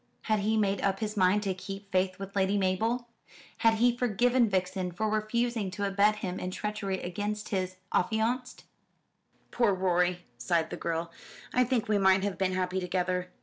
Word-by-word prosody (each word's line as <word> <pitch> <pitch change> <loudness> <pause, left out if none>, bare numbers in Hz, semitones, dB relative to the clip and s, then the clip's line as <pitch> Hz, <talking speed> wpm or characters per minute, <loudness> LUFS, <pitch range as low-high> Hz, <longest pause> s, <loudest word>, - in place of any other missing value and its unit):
Had 215 -1 +1
he 215 +2 +1
made 200 -2 +1
up 195 -1 0
his 215 -1 -3
mind 195 +1 +3
to 195 -2 0
keep 195 +2 -8
faith 185 0 +1
with 195 0 -8
Lady 195 +1 +2
Mabel? 220 +6 0 0.5
Had 225 -1 +4
he 240 +2 +3
forgiven 245 0 +2
Vixen 185 -1 -1
for 215 +5 -2
refusing 215 0 0
to 200 +2 -3
abet 200 +2 +3
him 190 -3 -4
in 180 - -3
treachery 200 -1 -3
against 205 +4 -3
his 185 -2 -2 0.2
affianced? 230 +5 0 0.9
"Poor 220 -5 +2
Rorie," 180 -1 +1 0.2
sighed 170 -3 0
the - - -3
girl; 165 0 -3 0.4
"I 250 - +4
think 245 -2 0
we 210 -1 +2
might 190 0 +4
have 200 -4 -2
been 190 -1 +1
happy 185 0 -1
together." 180 0 -1
195 Hz, 175 wpm, -29 LUFS, 185-215 Hz, 0.9 s, Had